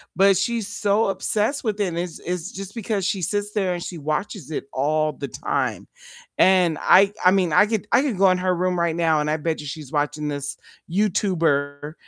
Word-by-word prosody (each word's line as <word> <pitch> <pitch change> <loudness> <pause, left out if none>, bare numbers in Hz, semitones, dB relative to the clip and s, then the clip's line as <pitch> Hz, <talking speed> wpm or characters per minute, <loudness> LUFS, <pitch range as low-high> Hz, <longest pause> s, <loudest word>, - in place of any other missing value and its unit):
But 195 0 +5
she's 220 +2 -1
so 205 0 +1
obsessed 215 +7 -1
with 215 -3 -2
it 205 - +1
and 170 - -4
it's 170 -2 -4
it's 180 +2 -4
just 195 +3 -8
because 210 -4 -2
she 195 -2 -1
sits 205 +4 -2
there 190 -4 0
and 175 - -5
she 175 0 -6
watches 160 +4 -4
it 145 - -4
all 155 +3 +1
the 140 -1 -6
time. - - -2 0.5
And 180 -4 +4
I 195 +2 +5
I 180 - +8
mean, 185 -5 +1
I 205 - +6
could 210 -1 -2
I - - +5
could 265 -9 -2
go 195 0 +5
in 185 - +2
her 180 0 0
room 180 0 0
right 170 -1 0
now 165 -2 +2
and 150 - -1
I 155 - +1
bet 160 0 -2
you - - -9
she's 145 -1 -7
watching 150 0 -1
this 140 -1 -4 0.3
YouTuber 165 -7 0
180 Hz, 215 wpm, -23 LUFS, 155-200 Hz, 0.5 s, I